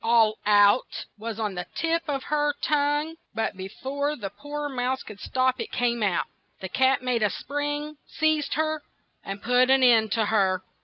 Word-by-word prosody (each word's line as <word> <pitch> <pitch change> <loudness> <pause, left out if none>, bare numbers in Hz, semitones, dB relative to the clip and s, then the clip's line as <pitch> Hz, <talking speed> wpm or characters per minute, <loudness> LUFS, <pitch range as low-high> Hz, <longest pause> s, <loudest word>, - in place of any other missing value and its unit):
"All 225 -2 +3
out'' 205 +3 +4
was 225 0 -5
on 210 -3 -1
the 180 0 -5
tip 330 0 +1
of 275 -2 -2
her 295 -1 0
tongue, 295 +2 +1 0.2
and 225 - -1
be 190 0 -6
fore 280 +7 -3
the 200 -8 -6
poor 295 +3 -5
mouse 260 -1 -2
could 205 -2 -11
stop, 255 +2 0
it - - -6
came 240 -1 0
out. 195 -5 +1 0.3
The 190 - -6
cat 260 +2 +2
made 250 -2 0
a 210 - +3
spring, 290 +5 -4
seized 310 -1 0
her, 310 0 0 0.4
and 195 +1 -6
put 250 +1 +3
an 265 0 +5
end 225 -4 +5
to 225 -2 +1
her. 190 -3 +1
255 Hz, 185 wpm, -26 LUFS, 215-290 Hz, 0.4 s, an